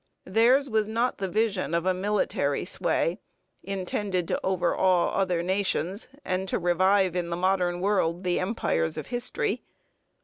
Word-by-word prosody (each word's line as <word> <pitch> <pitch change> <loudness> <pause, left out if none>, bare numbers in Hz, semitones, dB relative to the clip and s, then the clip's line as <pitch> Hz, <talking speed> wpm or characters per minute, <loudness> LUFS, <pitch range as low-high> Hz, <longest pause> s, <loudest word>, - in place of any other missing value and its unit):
Theirs 240 +8 +4
was 220 -4 +1
not 230 +3 -1
the 195 - -1
vision 200 -4 0
of 170 +1 0
a 185 - +3
military 205 +3 0
sway - - 0 0.4
intended 190 -1 -2
to - - -1
overawe 185 -1 +2
other 180 -3 0
nations 190 0 -1 0.2
and 185 +1 -1
to - - 0
revive 185 +1 +2
in 175 -1 -1
the 170 - -1
modern 180 -1 +1
world 185 -3 +1
the 180 -1 +1
empires 80 - -1
of - - -4
history. 420 - -1
190 Hz, 145 wpm, -27 LUFS, 175-210 Hz, 0.4 s, Theirs